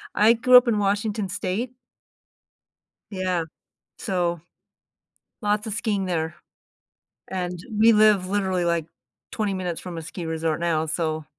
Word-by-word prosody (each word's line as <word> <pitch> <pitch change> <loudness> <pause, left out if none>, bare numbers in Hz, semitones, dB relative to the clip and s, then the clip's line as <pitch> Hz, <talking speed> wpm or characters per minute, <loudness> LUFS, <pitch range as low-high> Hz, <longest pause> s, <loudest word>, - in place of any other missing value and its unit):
I 215 +2 +6
grew 250 +2 +7
up 250 0 +5
in 225 -3 +2
Washington 205 +1 0
state. 200 +5 -3 1.4
Yeah. 185 -3 -1 0.5
So, 175 -3 -1 1.0
lots 210 +1 0
of 215 - -3
skiing 210 -3 -1
there, 165 -2 -2 0.9
and 180 -2 -4 0.2
we 225 +2 +6
live 210 -3 +4
literally, 190 -3 0
like, 170 -2 0 0.5
20 210 -3 -1
minutes 180 -3 -3
from 180 -2 -7
a - - -4
ski 165 +2 -7
resort 160 0 -1
now, 165 -2 0
so 155 -1 -2
185 Hz, 130 wpm, -24 LUFS, 170-210 Hz, 1.4 s, grew